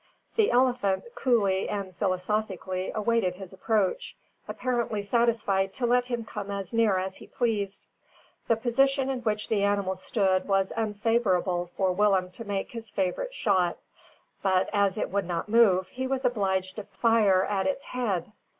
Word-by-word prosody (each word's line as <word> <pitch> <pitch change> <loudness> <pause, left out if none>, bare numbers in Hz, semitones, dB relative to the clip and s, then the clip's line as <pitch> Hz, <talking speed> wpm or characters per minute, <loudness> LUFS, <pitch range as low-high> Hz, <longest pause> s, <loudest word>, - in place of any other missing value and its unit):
The 440 -2 +3
elephant, 245 -6 +2
coolly 200 -7 +1
and 195 -3 -4
philosophically, 185 0 -2
awaited 215 -4 +1
his 190 0 -10
approach, 200 0 -1 0.3
apparently 235 -4 -2
satisfied 205 -4 +1
to 255 - -1
let 245 +1 +2
him 240 -2 -3
come 205 -2 -6
as 200 +1 -5
near 225 -4 +3
as 190 +1 -3
he - - -13
pleased. 210 -5 -2 0.6
The 230 - +4
position 270 +4 +1
in 260 - -2
which 215 -3 -2
the 215 -3 +1
animal 200 -2 +1
stood 190 -1 0
was 195 -1 +1
unfavourable 205 -5 0
for 190 -1 +2
Willem 190 -1 +2
to 230 - -9
make 200 -2 -3
his 230 -2 -7
favourite 200 - -2
shot; 185 -4 +1 0.6
but, 190 -1 +1
as 200 -1 +2
it - - -2
would 200 -1 0
not 175 +3 -3
move, 195 -5 +4
he 260 +1 -4
was 265 0 -2
obliged 190 -5 0
to 210 - -4
fire 205 -2 +3
at 195 -2 -1
its 270 +9 -1
head. 210 -7 -2
205 Hz, 160 wpm, -27 LUFS, 190-230 Hz, 0.6 s, The